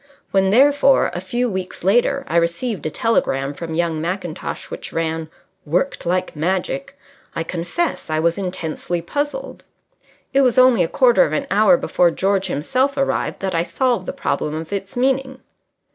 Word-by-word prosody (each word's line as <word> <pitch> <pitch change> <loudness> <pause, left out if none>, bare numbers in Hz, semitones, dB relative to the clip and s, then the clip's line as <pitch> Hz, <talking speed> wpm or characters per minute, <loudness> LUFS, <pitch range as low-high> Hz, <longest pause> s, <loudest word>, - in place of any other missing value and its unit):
When, 195 -1 +3
therefore, 275 +4 +4
a 175 - -4
few 240 +7 -1
weeks 190 -6 -5
later, 240 +8 +2
I 170 - 0
received 170 +5 -1
a - - -1
telegram 140 -9 0
from 165 +2 -6
young 165 -2 0
Mackintosh 175 -1 -4
which - - -6
ran: 160 -1 -2 0.3
Worked 175 - -1
like 185 0 -1
magic, 190 - -2 0.4
I 165 - -1
confess 180 - -3
I 155 - 0
was 170 +1 +2
intensely 180 -2 -3
puzzled. 290 - -4 0.7
It 275 - +5
was 250 -3 +2
only 255 -7 +6
a - - 0
quarter 245 +5 +4
of 150 - -2
an - - -1
hour 215 +7 +5
before 180 -9 +2
George 195 +2 0
himself 260 - 0
arrived 275 - -1
that 190 -1 -2
I 165 - +2
solved 185 +4 0
the - - -1
problem 150 0 -2
of 160 +3 -5
its 195 +2 -5
meaning. 265 +1 0
190 Hz, 165 wpm, -20 LUFS, 170-255 Hz, 0.7 s, only